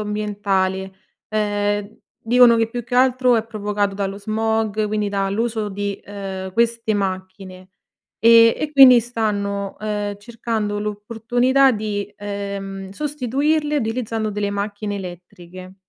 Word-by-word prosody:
ambientale. 200 Hz, -2 st, -1 dB, 0.4 s
Ehm, 205 Hz, 0 st, -1 dB, 0.2 s
dicono 240 Hz, 0 st, +5 dB
che 225 Hz, -1 st, +1 dB
più 240 Hz, +1 st, -5 dB
che 240 Hz, -, -5 dB
altro 255 Hz, -1 st, +4 dB
è 220 Hz, -, 0 dB
provocato 205 Hz, -2 st, -2 dB
dallo 195 Hz, 0 st, -3 dB
smog, 220 Hz, 0 st, -1 dB
quindi 210 Hz, 0 st, -1 dB
dall'uso 210 Hz, +3 st, -1 dB
di 200 Hz, 0 st, -4 dB
ehm, 195 Hz, -2 st, -6 dB
queste 230 Hz, +1 st, +1 dB
macchine, 185 Hz, -1 st, -5 dB, 0.5 s
e 230 Hz, +1 st, +7 dB
e 305 Hz, -1 st, -3 dB
quindi 265 Hz, -4 st, +8 dB
stanno, 200 Hz, -4 st, -2 dB
ehm, 205 Hz, -1 st, -3 dB
cercando 220 Hz, -1 st, -3 dB
l'opportunità 230 Hz, +6 st, +1 dB
di, 205 Hz, -3 st, -3 dB
ehm, 200 Hz, -1 st, -6 dB
sostituirle 295 Hz, +4 st, -1 dB
utilizzando 225 Hz, -3 st, -2 dB
delle 205 Hz, 0 st, -2 dB
macchine 205 Hz, 0 st, -3 dB
elettriche. 185 Hz, 0 st, -10 dB
210 Hz, 115 wpm, -21 LUFS, 200-230 Hz, 0.5 s, quindi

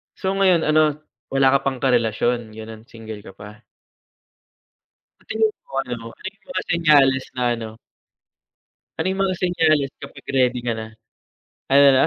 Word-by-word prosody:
So, 190 Hz, -1 st, -2 dB
ngayon 190 Hz, -4 st, +3 dB
ano, 155 Hz, -1 st, +3 dB, 0.3 s
wala 135 Hz, -1 st, +3 dB
ka 140 Hz, -, +4 dB
pang 130 Hz, -1 st, -3 dB
karelasyon, 120 Hz, -2 st, +1 dB
gano'n, 110 Hz, +1 st, -10 dB
single 110 Hz, -2 st, -9 dB
ka 95 Hz, -2 st, -13 dB
pa? 105 Hz, +1 st, -13 dB, 1.6 s
Sa -, -, -44 dB
tingin 220 Hz, -1 st, +2 dB
mo -, -, -19 dB
ano, 120 Hz, -3 st, -6 dB
ano 190 Hz, -, -9 dB
yung 215 Hz, -1 st, -34 dB
mga 275 Hz, -, -3 dB
senyales 145 Hz, -6 st, +4 dB
na 125 Hz, -, -2 dB
ano 110 Hz, -1 st, -6 dB, 1.3 s
ano -, -, -1 dB
yung 195 Hz, +1 st, -2 dB
mga 185 Hz, -, -1 dB
senyales 155 Hz, -6 st, +2 dB
kapag -, -, -11 dB
ready 125 Hz, -2 st, +2 dB
ka 120 Hz, -, -1 dB
na? 110 Hz, -1 st, -4 dB, 0.8 s
Ano, 140 Hz, +1 st, +7 dB
'no? 130 Hz, -, +4 dB
135 Hz, 155 wpm, -22 LUFS, 115-160 Hz, 1.6 s, Ano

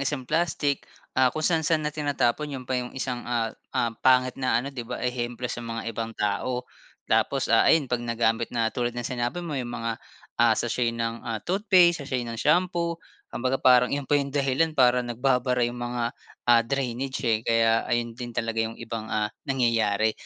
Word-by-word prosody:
isang 135 Hz, -1 st, -2 dB
plastic, 145 Hz, -3 st, 0 dB, 0.3 s
ah, 130 Hz, 0 st, +4 dB
kung 155 Hz, +4 st, -4 dB
saan-saan 160 Hz, -2 st, +2 dB
na 150 Hz, -, -1 dB
tinatapon 145 Hz, -1 st, 0 dB
yun 130 Hz, -3 st, -6 dB
pa 125 Hz, 0 st, -1 dB
yung 125 Hz, +1 st, -8 dB
isang, 125 Hz, -2 st, -3 dB
ah 115 Hz, -2 st, 0 dB, 0.2 s
ah 115 Hz, -1 st, +1 dB
pangit 130 Hz, -1 st, +4 dB
na 130 Hz, -, +2 dB
ano, 140 Hz, -, -6 dB
'di 130 Hz, -, -5 dB
ba, -, -, -3 dB
ehemplo 120 Hz, 0 st, -3 dB
sa 120 Hz, -, -5 dB
mga 115 Hz, -1 st, -5 dB
ibang 115 Hz, -1 st, -5 dB
tao. 125 Hz, +5 st, -1 dB, 0.4 s
Tapos, -, -, +1 dB
ah, -, -, +5 dB
ayun 160 Hz, -3 st, +5 dB
'pag 125 Hz, -2 st, -2 dB
nagamit 115 Hz, -1 st, 0 dB
na 115 Hz, -2 st, 0 dB
tulad 120 Hz, 0 st, -2 dB
ng 120 Hz, -, -3 dB
sinabi 125 Hz, +8 st, -3 dB
mo 165 Hz, -, -5 dB
yung 130 Hz, -4 st, -3 dB
mga, 115 Hz, -1 st, -3 dB, 0.4 s
ah, 115 Hz, -2 st, +5 dB
sachet 120 Hz, 0 st, 0 dB
ng, 115 Hz, 0 st, -2 dB
ah, 115 Hz, -1 st, -3 dB
toothpaste, 180 Hz, -3 st, +4 dB
sachet 130 Hz, -3 st, -2 dB
ng 115 Hz, -1 st, -5 dB
shampoo, 170 Hz, +1 st, +1 dB, 0.4 s
kung -, -, -4 dB
baga 130 Hz, +1 st, +1 dB
parang 125 Hz, -1 st, +5 dB
yun 140 Hz, -1 st, -2 dB
pa 145 Hz, -, -4 dB
yung 140 Hz, -, -3 dB
dahilan 140 Hz, +3 st, 0 dB
para 125 Hz, -1 st, +5 dB
nagbabara 125 Hz, +1 st, +1 dB
yung 120 Hz, +1 st, -4 dB
mga, 120 Hz, -1 st, -2 dB, 0.4 s
ah, 120 Hz, -1 st, +7 dB
drainage, 130 Hz, +1 st, -2 dB
eh, 110 Hz, -2 st, +2 dB
kaya 115 Hz, 0 st, +3 dB
ayun 120 Hz, -1 st, 0 dB
din 120 Hz, +1 st, -7 dB
talaga 115 Hz, 0 st, -1 dB
yung 115 Hz, 0 st, -6 dB
ibang, 115 Hz, -1 st, -6 dB
ah, 105 Hz, -1 st, 0 dB, 0.2 s
nangyayari. 110 Hz, -4 st, +2 dB
125 Hz, 195 wpm, -26 LUFS, 115-135 Hz, 0.4 s, ah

